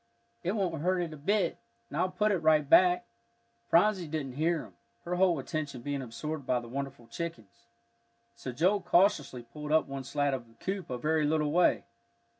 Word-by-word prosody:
"It 180 - -1
won't 180 -8 -1
hurt 185 +3 +2
it 170 -3 -3
a - - -7
bit, 180 +4 0 0.3
and - - -9
I'll 185 +1 +2
put 210 +3 +1
it 190 - +1
right 155 -2 +3
back." 180 +3 +5 0.6
Phronsie 185 0 +3
didn't 150 -3 -3
hear 160 +4 0
him, 105 -6 -14 0.3
her 175 - -2
whole 180 -3 +4
attention 140 -3 -4
being 140 0 -2
absorbed 140 +5 -5
by 125 - +2
the 120 - -10
wonderful 135 -1 -5
chickens. 115 - -7 0.7
So 130 - -6
Joel 185 +10 +2
cautiously 150 - +2
pulled 150 +6 -8
up 155 0 +4
one 135 -1 -6
slat 145 +1 0
of 125 -3 -4
the 115 - -22
coop 190 +9 -4
a 125 - -3
very 155 +3 +1
little 150 -1 +1
way. 175 +2 +3
155 Hz, 190 wpm, -30 LUFS, 135-175 Hz, 0.7 s, back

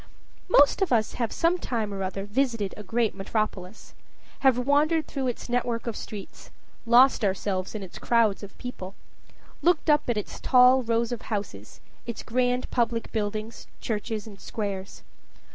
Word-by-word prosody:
Most 290 +3 +5
of 385 - +1
us 220 -3 +2
have 230 -3 -2
some 345 +2 +1
time 220 -8 -2
or 195 - -4
other 195 +1 -3
visited 230 -2 -1
a - - -8
great 225 +2 0
metropolis 195 -1 -4 0.5
have 265 -3 +4
wandered 295 +5 +2
through 270 -2 -3
its 245 - -4
network 240 -1 -1
of 235 -3 -3
streets 205 -3 -9 0.4
lost 245 +1 +6
ourselves 190 0 -1
in 210 - -4
its 185 - -10
crowds 230 -4 +2
of 200 -1 -11
people 195 -6 -7 0.7
looked 340 -2 +3
up 295 -3 +2
at 235 - +1
its 210 - -5
tall 255 0 +6
rows 230 0 0
of 240 -1 -4
houses, 200 - -5 0.3
its 235 - -5
grand 250 +1 0
public 235 -2 0
buildings, 215 +1 -4
churches, 215 -1 -3
and 205 -3 -12
squares. 200 -3 -5
230 Hz, 160 wpm, -26 LUFS, 205-250 Hz, 0.7 s, lost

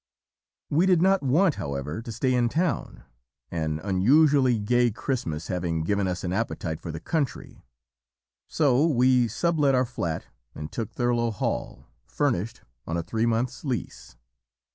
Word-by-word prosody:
"We 165 +6 +3
did 180 -3 +4
not 190 +2 +3
want, 150 +5 +2
however, 70 - -4
to 115 - -7
stay 130 +3 0
in 120 -1 +2
town, 165 -1 -2 0.5
an 80 -2 -2
unusually 130 +6 +4
gay 120 +3 +2
Christmas 95 - -3
having 85 -3 -2
given 100 +3 0
us 90 0 -3
an 90 -1 -2
appetite 85 -6 -3
for 85 - -5
the 80 - -6
country; 145 - -3 0.8
so 145 0 +3
we 125 -4 +3
sub 165 - -1
let 140 -2 +4
our 130 0 +3
flat 85 -10 -4 0.3
and 75 0 -7
took 115 -3 -4
Thurlow 120 -1 +1
Hall, 105 - -3 0.2
furnished, 115 -7 -1 0.2
on 80 - -2
a 85 - -2
three 115 +6 -1
months' 115 +2 -1
lease. 130 -6 -5
120 Hz, 150 wpm, -26 LUFS, 90-140 Hz, 0.8 s, did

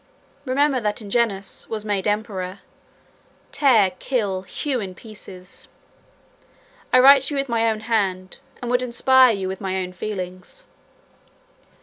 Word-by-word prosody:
166 - - -19
Remember 270 0 +1
that 210 0 -2
Ingenuus 205 -2 -1
was 215 -1 -4
made 205 -2 -1
emperor: 200 -3 -3 0.9
tear, 225 -10 +4
kill, 205 -8 -2
hew 260 +7 -3
in 190 -4 -6
pieces. 195 -3 -13 1.2
I - - +5
write 270 +2 +8
to 285 +2 -2
you - - 0
with 275 - -2
my 230 -2 +1
own 215 -1 -3
hand, 195 -5 -2 0.3
and 240 - -3
would 250 0 +2
inspire 255 +1 +4
you 190 -1 -4
with 190 +1 -6
my 190 -1 -2
own 180 -1 -4
feelings." 185 - -7
215 Hz, 140 wpm, -22 LUFS, 190-250 Hz, 1.2 s, write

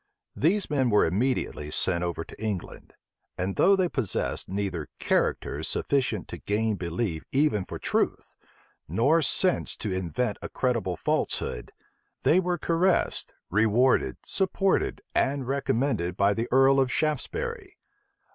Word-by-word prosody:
These 190 +6 +2
men 135 -4 +1
were 105 -2 +4
immediately 95 - -1
sent 85 +3 +3
over 85 -1 -2
to - - -11
England; 105 -5 -5 0.4
and 95 +2 -2
though 200 +2 +5
they 185 -2 +2
possessed 130 - -2
neither 95 -5 -3
character - - 0
sufficient 135 -3 -1
to - - -7
gain 110 +1 0
belief 85 -1 -3
even 135 -9 +2
for - - -6
truth, - - -1 0.5
nor 135 - +3
sense 180 +5 +1
to 105 -3 -3
invent 100 +5 -2
a - - -6
credible 115 -8 -1
falsehood, - - -2 0.5
they 175 - +5
were 180 -1 0
caressed, 170 +3 0 0.2
rewarded, 110 +6 +3
supported, 195 0 0
and 135 -1 0
recommended 130 - 0
by 100 +1 +3
the 115 +3 -2
earl 135 +1 +5
of 130 -1 +2
Shaftesbury. 385 - -2
125 Hz, 130 wpm, -27 LUFS, 95-150 Hz, 0.5 s, though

